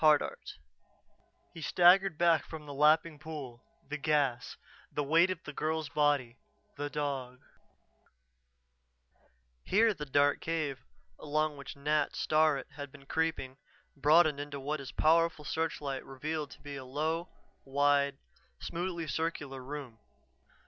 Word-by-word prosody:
HARDART 155 -1 +5
[Illustration: - - -12 0.9
He 165 - -9
staggered 180 +1 +5
back 165 -4 +4
from 155 +2 -9
the 145 - -7
lapping 150 +2 +3
pool 140 -7 -8 0.2
the 150 +1 -4
gas 140 -5 0 0.3
the 145 - -1
weight 165 +5 +4
of 185 -1 -4
the 150 - -8
girl's 155 0 -2
body 145 -4 +1 0.4
the 145 0 -3
dog 135 -4 -3 1.1
] - - -41
Here 220 +2 +5
the 150 -5 -7
dark 145 +1 +3
cave, 155 -5 -2 0.4
along 155 0 0
which 140 0 -9
Nat 150 +2 0
Starrett 155 -3 +2
had 145 -2 -8
been 140 0 -15
creeping, 160 -4 -1 0.4
broadened 150 +1 +4
into 145 -1 -5
what 145 +3 -3
his 135 -1 -7
powerful 165 -1 +2
searchlight 145 -4 -2
revealed 150 +3 -4
to 140 - -14
be 145 0 -7
a 135 - -7
low, 155 +6 -2 0.3
wide, 140 0 +2 0.4
smoothly 170 -1 -3
circular 145 -4 -3
room. 135 -4 -7
145 Hz, 135 wpm, -31 LUFS, 135-160 Hz, 1.1 s, HARDART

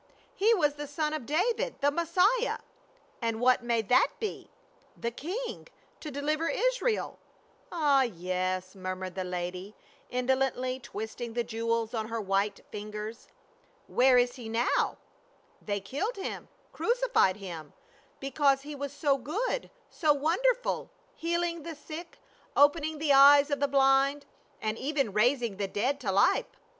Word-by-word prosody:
He 425 +4 +3
was 295 -7 +2
the 295 0 -5
son 300 +2 -2
of 305 -6 -4
David 460 - 0
— - - -36
the 285 +1 +3
Messiah," 365 +10 +2 0.6
"And 230 -1 -1
what 255 +1 +4
may 235 -2 +1
that 250 +5 +4
be 435 -2 -5 0.2
?" - - -33
"The 235 - -2
King 400 - -5 0.2
— - - -34
to 310 - -5
deliver 305 +3 -1
Israel." - - 0 0.5
"Ah, 295 -5 +3
yes," 185 -3 -2
murmured 185 -1 -5
the 190 - -3
lady, 180 +2 -5 0.3
indolently 255 0 0
twist 220 -1 -7
ing 235 -1 -4
the 240 0 0
jewels 230 0 -2
on 220 -2 -2
her 230 0 -3
white 200 0 0
fingers. 210 +2 -6 0.3
" - - -35
Where 255 0 +4
is 245 +1 +2
he 235 -3 -7
now?" 230 +2 +1 0.6
"They 205 -1 -2
killed 285 - -3
him 390 - -5
— - - -35
crucified 475 - +2
him, 170 -7 -8 0.5
because 275 0 +2
he 300 +1 -7
was 285 -1 -5
so 285 -1 +1
good, 420 - -2 0.2
so 305 -3 +3
wonderful, 420 - 0 0.3
healing 340 0 -1
the 330 +1 -7
sick, 320 +3 -9 0.4
opening 300 +2 +4
the 300 -1 +2
eyes 280 +1 +8
of 285 - 0
the 285 - +2
blind, 275 +1 +3 0.4
and 215 +1 -1
even 275 -6 -1
raising 235 -1 +2
the 200 -1 -1
dead 255 +9 -1
to 215 -8 -2
life." 335 - +3
270 Hz, 155 wpm, -29 LUFS, 220-310 Hz, 0.6 s, eyes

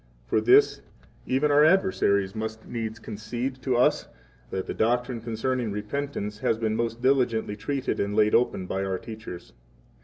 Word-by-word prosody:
For - - +1
this 410 +3 +5 0.5
even 135 +3 +2
our 145 +1 +6
adversaries 155 - +3
must 110 0 -5
needs 115 -2 -4
concede 120 +4 -5
6 130 - -24
to 130 -3 +2
us 125 - +2 0.4
that 95 -1 -3
the - - -4
doctrine 120 +1 0
concerning 120 +1 -2
repentance 105 0 -4
has 110 - +1
been 110 -1 -1
most 115 +1 -2
diligently 125 -6 +2
treated 135 +5 -2
and 100 +1 -1
laid 105 0 +3
open 115 -6 +2
by 95 +1 -2
our 95 -1 -1
teachers. 110 -5 -9
115 Hz, 160 wpm, -26 LUFS, 105-130 Hz, 0.5 s, our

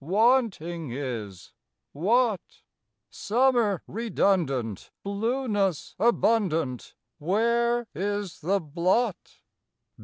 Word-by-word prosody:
Wanting 185 - +1
is 115 -8 -6 0.4
what? 215 - 0 0.5
Summer 235 -4 +1
redundant, 175 - -1
Blueness 205 - -1
abundant, 190 - +1 0.2
Where 235 +7 +1
is 200 +2 -3
the 190 +6 +1
blot? 180 +7 -1
200 Hz, 65 wpm, -26 LUFS, 160-230 Hz, 0.5 s, Wanting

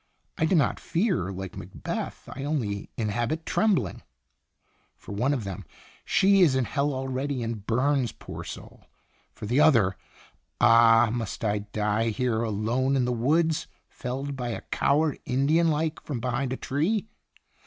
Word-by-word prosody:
' - - -46
I 160 - +3
do 170 - +2
not 150 - +2
fear; 170 - 0
like 95 0 -6
Macbeth, - - -6
I 135 - -6
only 115 -10 -2
inhabit 120 +9 -1
trembling/ 185 - +1 0.5
* - - -42
For - - -11
one 120 +8 0
of 135 -6 -1
them 95 -2 -6 0.4
she 195 0 +4
is 155 -7 +5
in 130 -2 +1
hell 145 +2 0
already, 130 0 -2
and 115 -3 -5
burns, 130 0 +1
poor - - -9
soul! - - -10 0.5
For - - -9
the 120 +7 +1
other' 115 -12 +5 0.6
Ah! 115 -1 +6
must 115 -1 -4
I 105 0 +1
die 105 +2 -1
here, 115 0 0
alone 115 +5 0
in 130 -2 +2
the 125 - 0
woods, 155 +7 +1 0.2
felled 135 +3 -5
by 125 -2 -3
a 115 - -4
coward, 150 +1 +2
Indian 145 +6 +2
like, 160 0 0
from 140 -5 -4
behind 125 +2 -2
a 130 - -2
tree 185 +11 -1
130 Hz, 160 wpm, -26 LUFS, 115-145 Hz, 0.6 s, Ah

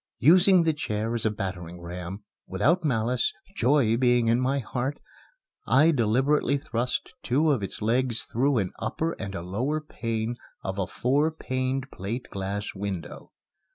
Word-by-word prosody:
Using 180 - +6
the 160 -1 +2
chair 110 -5 -2
as 115 -2 +1
a - - +3
battering 90 -5 -5
ram, 90 +3 -7 0.2
without 160 - +2
malice 125 -3 +1 0.2
joy 130 - +3
being 120 -2 +3
in 120 +2 +3
my 135 +2 +1
heart 130 +2 -3 0.7
I 155 +5 +5
deliberately 135 +3 +2
thrust 125 -4 -3
two 150 +5 +2
of 130 -7 +1
its 100 +2 -5
legs 120 +1 +1
through 135 +3 +1
an 95 -4 0
upper 165 +1 -1
and 100 -2 -5
a 85 - -4
lower 125 - -1
pane 115 -5 -3 0.3
of 95 +1 -3
a 95 - 0
four 140 +5 +1
paned 130 -3 -3
plate 110 +7 -5
glass 100 +2 -3
window. 95 -3 -6
120 Hz, 155 wpm, -26 LUFS, 105-140 Hz, 0.7 s, Using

